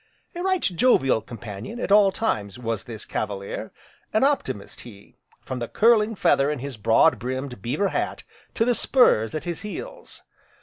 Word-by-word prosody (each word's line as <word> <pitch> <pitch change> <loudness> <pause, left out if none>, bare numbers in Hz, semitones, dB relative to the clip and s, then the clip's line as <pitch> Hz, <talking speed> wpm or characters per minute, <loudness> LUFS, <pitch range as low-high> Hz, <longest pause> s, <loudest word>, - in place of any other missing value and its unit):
A 350 - -5
right 375 -1 0
jovial 170 - +3
companion, 115 - -8
at 200 - -3
all 205 -1 +6
times, 105 - -2
was 115 -3 -4
this 115 -3 -8
Cavalier, 100 -2 -4 0.4
an 215 - +3
optimist 275 - -1
he, 100 -4 -14 0.3
from 130 - -5
the 120 - -3
curling 225 -1 +3
feather 140 -6 +3
in 150 - -1
his 135 0 -6
broad 110 +1 +3
brimmed 130 -2 -5
beaver 190 - 0
hat, - - -3 0.3
to 225 - +2
the 245 - +3
spurs 155 - +3
at 155 - -3
his 170 -3 -4
heels. - - -8
140 Hz, 165 wpm, -24 LUFS, -, 0.4 s, all